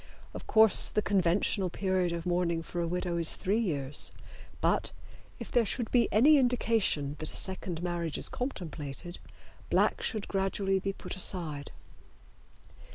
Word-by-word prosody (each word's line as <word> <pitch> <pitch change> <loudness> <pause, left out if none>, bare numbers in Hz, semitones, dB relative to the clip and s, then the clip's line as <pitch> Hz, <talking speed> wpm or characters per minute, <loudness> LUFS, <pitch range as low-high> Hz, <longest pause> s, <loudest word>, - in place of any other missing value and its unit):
Of - - -9
course 220 -2 +7
the 210 - 0
conventional 190 0 +1
period 185 -1 0
of 170 0 -4
mourning 175 -2 0
for 175 +1 -4
a 170 - -1
widow 175 0 -2
is 165 -1 -1
three 205 +3 0
years, 145 - -2 0.5
but, - - +1 0.5
if - - -9
there 240 - +3
should 225 +2 -2
be 240 -2 +3
any 290 +8 +6
indication 225 - +1
that 155 - -3
a - - -9
second 185 -3 -2
marriage 170 -3 -2
is - - +1
contemplated, 175 - -5 0.5
black - - +2
should 215 -3 -3
gradually 195 0 0
be 195 +1 -2
put - - -7
aside. 165 -7 -2
185 Hz, 150 wpm, -30 LUFS, 170-205 Hz, 0.5 s, course